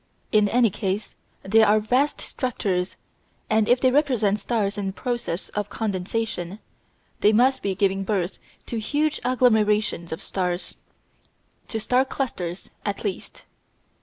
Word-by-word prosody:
In 210 -1 +4
any 235 -2 +4
case 195 +2 -3 0.3
they 220 +4 +4
are 215 0 +5
vast 255 +7 +1
structures, 195 -8 -2 0.5
and 220 -1 +3
if 245 +1 +5
they 260 0 +4
represent 250 -8 +2
stars 205 -2 -1
in 195 -2 -3
process 240 -7 -3
of 210 0 -3
condensation, 200 -2 -3 0.6
they 210 - +5
must 255 +4 +3
be 195 -1 -1
giving 195 0 +1
birth 195 -2 -1 0.3
to 230 - -3
huge 295 +7 0
agglomerations 220 -7 +2
of 160 - -3
stars 180 -1 -3 0.9
to 225 - -3
star 250 +4 +3
clusters 195 -10 -4
at 205 -1 -3
least. 200 -4 -5
215 Hz, 135 wpm, -24 LUFS, 195-245 Hz, 0.9 s, are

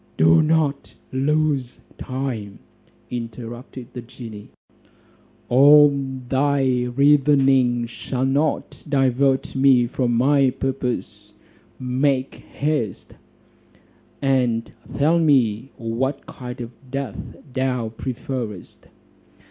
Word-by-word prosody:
"Do 80 +1 +5
not 155 -3 0 0.2
lose 140 -1 0 0.2
time," 130 -6 -4 0.5
interrupted 120 +1 -7
the 125 - -6
genie; 115 -3 -10 1.0
"all 145 +4 +7 0.4
thy 135 -2 +1
reasonings 135 -2 +3
shall 130 +1 -3
not 140 +3 -1
divert 135 -1 +1
me 130 -2 +4
from 120 0 -1
my 135 +2 +4
purpose: 125 -6 -4 0.5
make 130 +1 0
haste, 145 -9 -3 1.1
and 125 -4 +1 0.3
tell 160 +4 +3
me 130 -6 +2
what 130 +4 -3
kind 125 0 -8
of 120 0 -6 0.2
death 135 -5 -5 0.2
thou 130 -3 -1
preferest?" 115 -3 -6
130 Hz, 85 wpm, -22 LUFS, 120-140 Hz, 1.1 s, all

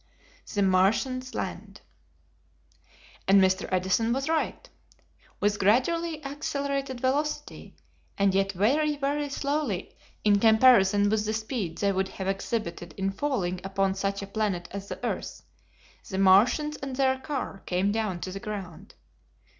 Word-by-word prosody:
The 205 - +1
Martians 225 +8 +1
Land. - - -5 1.5
And 195 +1 +7
Mr. 190 0 +2
Edison 190 +5 +1
was 270 +3 -2
right. 325 +9 -1 0.7
With 205 0 +1
gradually 305 - +1
accelerated 280 -2 -3
velocity, 285 +4 -2 0.4
and 195 -1 +3
yet 195 0 +2
very, 290 - +2
very 290 +1 -1
slowly 280 -8 -2 0.3
in 205 -1 +4
comparison 220 -3 +5
with 215 -1 +1
the 215 - 0
speed 215 -6 -3
they 200 -1 +1
would 190 0 0
have 190 - -6
exhibited 195 -3 -3
in 195 0 0
falling 195 -7 -2
upon 195 0 0
such 195 +1 -2
a - - -4
planet 200 -4 -2
as 200 0 -6
the - - -5
earth, - - -4 0.7
the 190 - -3
Martians 230 +11 +4
and 270 -1 -5
their 265 0 +2
car 265 -7 -4
came 185 +3 +1
down 210 -5 -2
to 185 - -4
the 195 - -6
ground. 195 -3 -7
210 Hz, 140 wpm, -27 LUFS, 195-270 Hz, 1.5 s, And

